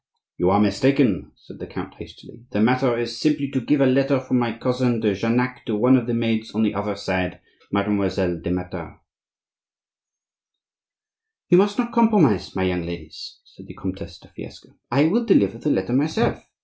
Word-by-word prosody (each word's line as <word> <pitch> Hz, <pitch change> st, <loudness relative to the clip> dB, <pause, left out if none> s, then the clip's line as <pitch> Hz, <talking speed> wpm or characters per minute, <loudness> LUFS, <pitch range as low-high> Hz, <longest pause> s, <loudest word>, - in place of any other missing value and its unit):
"You 90 Hz, -, +2 dB
are 100 Hz, +2 st, +4 dB
mistaken," 105 Hz, +2 st, +2 dB
said -, -, -16 dB
the -, -, -8 dB
count, -, -, -8 dB
hastily, 115 Hz, -, -15 dB
"the 105 Hz, -, -3 dB
matter 125 Hz, +2 st, +2 dB
is 115 Hz, 0 st, -4 dB
simply 145 Hz, -2 st, 0 dB
to 130 Hz, -, -1 dB
give 145 Hz, +4 st, +1 dB
a -, -, +6 dB
letter 135 Hz, +1 st, +3 dB
from 130 Hz, -1 st, 0 dB
my 120 Hz, -1 st, 0 dB
cousin 125 Hz, -1 st, 0 dB
de 105 Hz, -2 st, +1 dB
Jarnac 120 Hz, +5 st, -1 dB
to 110 Hz, -, -1 dB
one 125 Hz, +5 st, +5 dB
of 120 Hz, -2 st, 0 dB
the 120 Hz, -, -1 dB
maids 115 Hz, -1 st, -2 dB
on 110 Hz, -, +1 dB
the 105 Hz, -, +1 dB
other 100 Hz, 0 st, -3 dB
side, 95 Hz, -2 st, -3 dB, 0.3 s
Mademoiselle 100 Hz, -3 st, 0 dB
de 85 Hz, -, -4 dB
Matha." 90 Hz, 0 st, -5 dB, 2.5 s
"You 180 Hz, -, +7 dB
must 205 Hz, +1 st, +2 dB
not 240 Hz, -1 st, -2 dB
compromise 205 Hz, -, +3 dB
my 95 Hz, -, 0 dB
young 90 Hz, -1 st, 0 dB
ladies," 85 Hz, -2 st, -9 dB
said -, -, -17 dB
the -, -, -12 dB
Comtesse 95 Hz, -2 st, -7 dB
de -, -, -21 dB
Fiesque. -, -, -12 dB, 0.2 s
"I 140 Hz, +4 st, +3 dB
will 230 Hz, +8 st, +1 dB
deliver 100 Hz, -, +2 dB
the 150 Hz, -, -2 dB
letter 95 Hz, -2 st, 0 dB
myself. 155 Hz, -, 0 dB
115 Hz, 180 wpm, -22 LUFS, 100-135 Hz, 2.5 s, You